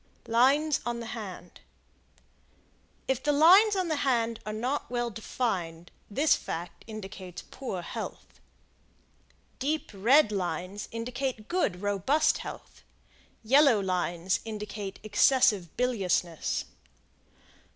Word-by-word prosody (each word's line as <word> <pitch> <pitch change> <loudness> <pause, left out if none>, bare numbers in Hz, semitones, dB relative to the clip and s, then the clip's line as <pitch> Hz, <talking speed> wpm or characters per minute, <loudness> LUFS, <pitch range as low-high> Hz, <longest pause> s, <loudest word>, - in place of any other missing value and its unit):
Lines 275 +6 +3
On 240 -1 -3
the 230 -1 -6
Hand. 190 -6 -8 1.5
If 265 -1 0
the 295 - +1
lines 370 +9 +6
of 370 -2 0
the 315 -2 0
hand 235 -5 0
are - - -2
not 245 +7 -2
well 240 -1 -1
defined, 180 -7 -3 0.2
this 290 +7 +3
fact 170 - -6
indicates 190 -4 -8
poor 220 -9 -5
health. - - -7 1.2
Deep 300 +4 -2
red 230 +6 +4
lines 185 +1 -3
indicate 240 0 -4
good, 210 - -1
robust 205 - +2
health. - - -9 0.6
Yellow 265 0 +5
lines 180 -1 -1
indicate 210 -2 -6
excessive 215 - +3
biliousness. 190 -9 0
225 Hz, 105 wpm, -28 LUFS, 190-270 Hz, 1.5 s, lines